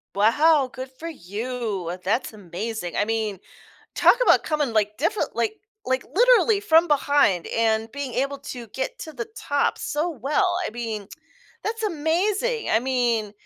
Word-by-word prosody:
Wow, 270 +7 +4
good 260 0 -7
for 330 - -6
you, 210 - -4
that's 220 +5 0
amazing. 200 0 -5
I 205 - +2
mean, 220 -3 -2 0.6
talk - - +6
about - - +5
coming 295 -6 -1
like, 210 -1 +1
different 335 - -1
like 430 - 0 0.3
like, 260 0 0
literally 475 -1 +5
from 345 -4 +4
behind 285 - +2
and 225 0 0
being 280 -3 -5
able 275 +2 -1
to 245 -4 -8
get 265 - -4
to 315 - -7
the 235 -4 -5
top 285 0 0
so 305 +4 -1
well, 305 - 0
I - - -6
mean, 220 -3 -5 0.6
that's 450 +1 -3
amazing 405 +7 0
I 220 - +4
mean 240 -4 0
260 Hz, 150 wpm, -24 LUFS, 220-320 Hz, 0.6 s, talk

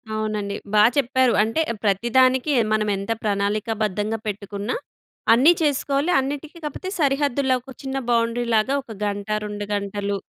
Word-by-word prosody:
అవునండి. 210 -2 -2 0.2
బా 210 0 +6
చెప్పారు. 260 -2 +3
అంటే 225 +9 0 0.2
ప్రతిదానికి 255 +7 +3 0.2
మనం 215 -1 +1
ఎంత 200 +3 -4
ప్రణాళికాబద్ధంగా 210 +1 -1
పెట్టుకున్నా, 205 - -4 0.6
అన్నీ 270 +9 +6
చేసుకోవాలి 285 +2 +1
అన్నిటికి 290 +4 -4
కాపోతే 370 +6 -5
సరిహద్దుల్లో 275 -2 +2
ఒక 265 +1 -12
చిన్న 270 0 -3
బౌండరీ 235 0 +1
లాగా 220 +6 +2
ఒక 230 - -12
గంట, 205 0 -3 0.2
2 205 0 -5
గంటలు 200 0 -2
230 Hz, 130 wpm, -23 LUFS, 205-270 Hz, 0.6 s, బా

